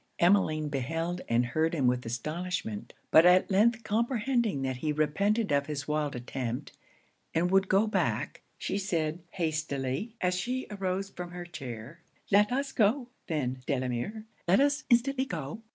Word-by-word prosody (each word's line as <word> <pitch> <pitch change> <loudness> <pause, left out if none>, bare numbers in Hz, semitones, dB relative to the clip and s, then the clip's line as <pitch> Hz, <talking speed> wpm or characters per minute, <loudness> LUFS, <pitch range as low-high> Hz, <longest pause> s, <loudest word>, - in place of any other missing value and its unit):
Emmeline 170 -4 +3
beheld 165 +6 -2
and 120 +1 +3
heard 160 +7 0
him 140 -5 +1
with 125 0 +2
astonishment. 150 - -4 0.2
But 160 - +8
at 180 +3 +5
length 225 +4 +3
comprehending 230 - 0
that 130 -1 -2
he 150 +4 -1
repented 200 +9 +1
of 140 0 +2
his 145 -3 -4
wild 150 -2 -1
attempt, 125 +1 -4 0.6
and 175 +2 +2
would 195 0 +4
go 195 +3 +4
back, 215 - -1 0.2
she 200 - -2
said 165 -4 -1
hastily, 155 - -2
as 180 0 +1
she 250 +8 -2
arose 195 -1 -2
from 175 0 -6
her 175 0 -7
chair 135 -3 -8 0.3
'Let 205 +2 +5
us 275 +2 -1
go, 240 +3 +2 0.2
then, 130 -5 -2
Delamere; 130 - -2 0.2
let 185 +6 +5
us 285 +1 +2
instantly 260 +2 +3
go. 165 - -5
175 Hz, 150 wpm, -29 LUFS, 140-210 Hz, 0.6 s, But